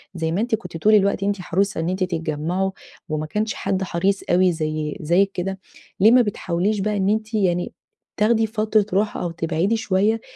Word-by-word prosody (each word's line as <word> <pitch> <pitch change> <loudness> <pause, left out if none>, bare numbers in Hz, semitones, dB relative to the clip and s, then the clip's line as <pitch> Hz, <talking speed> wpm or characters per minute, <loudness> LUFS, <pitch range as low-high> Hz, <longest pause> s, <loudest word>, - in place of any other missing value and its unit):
زي 160 -1 -2
ما 180 +5 0
أنتِ 230 0 +1
كنتِ 180 -6 -8
طول 215 +6 +4
الوقت 200 0 +2
أنتِ 200 -1 -1
حريصة 195 +1 0
إن 165 +1 -1
أنتِ 185 +1 -1
تتجمّعوا 170 +2 -2 0.4
وما 155 0 -2
كانش 215 +7 -2
حد 190 -1 -2
حريص 190 +2 0
أوي 180 +1 +4
زي 155 -2 -3
زيِّك 180 +5 +2
كده، 190 +2 -3 0.4
ليه 215 +4 +6
ما 250 0 +7
بتحاوليش 200 -1 -1
بقى 210 +1 -1
إن 195 +1 +1
أنتِ 220 +1 -1
يعني 180 -4 0 0.4
تاخدي 220 +1 +3
فترة 215 -1 +1
راحة 210 - -2
أو 175 - -2
تبعدي 170 +6 0
شوية، 215 +2 +1
190 Hz, 185 wpm, -22 LUFS, 170-210 Hz, 0.4 s, ما